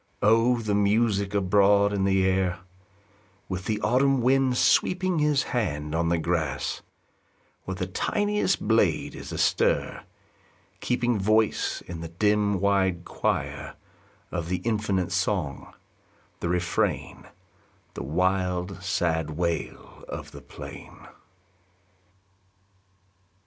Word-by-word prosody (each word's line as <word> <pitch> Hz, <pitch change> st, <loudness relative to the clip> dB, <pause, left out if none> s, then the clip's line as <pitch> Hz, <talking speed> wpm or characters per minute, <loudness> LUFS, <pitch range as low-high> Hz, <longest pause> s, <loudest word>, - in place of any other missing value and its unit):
O 115 Hz, +4 st, +4 dB
the 110 Hz, -3 st, -2 dB
music 100 Hz, 0 st, +1 dB
abroad 100 Hz, +1 st, +4 dB
in 95 Hz, -1 st, 0 dB
the 95 Hz, -1 st, +2 dB
air, 95 Hz, -1 st, +1 dB, 0.9 s
With 95 Hz, 0 st, -5 dB
the 105 Hz, -1 st, -1 dB
autumn 130 Hz, +5 st, +3 dB
wind 130 Hz, 0 st, +3 dB
sweeping 180 Hz, +2 st, +2 dB
His 150 Hz, -2 st, +2 dB
hand 75 Hz, -, -2 dB
on 85 Hz, 0 st, +1 dB
the 85 Hz, -, +2 dB
grass, 80 Hz, -5 st, -2 dB, 0.8 s
where 95 Hz, -, -4 dB
The 90 Hz, 0 st, -3 dB
tiniest 205 Hz, -, 0 dB
blade 105 Hz, -8 st, +2 dB
is -, -, -8 dB
astir, -, -, +1 dB, 0.8 s
keeping 120 Hz, -1 st, 0 dB
Voice 110 Hz, +2 st, +1 dB
in 85 Hz, -1 st, -7 dB
the 85 Hz, -, -5 dB
dim, 105 Hz, +3 st, +1 dB
wide 95 Hz, -3 st, +1 dB
choir, -, -, -2 dB, 0.6 s
Of 85 Hz, -2 st, -3 dB
the 90 Hz, -, 0 dB
infinite 105 Hz, -5 st, 0 dB
song, 90 Hz, -5 st, -2 dB, 0.7 s
the 85 Hz, -, -2 dB
refrain, 90 Hz, 0 st, -1 dB, 0.7 s
The -, -, -6 dB
wild, 90 Hz, +4 st, -1 dB
sad 85 Hz, -3 st, 0 dB
wail 85 Hz, -2 st, -3 dB
of -, -, -7 dB
the -, -, -11 dB
plain -, -, -11 dB
95 Hz, 110 wpm, -26 LUFS, 90-110 Hz, 0.9 s, O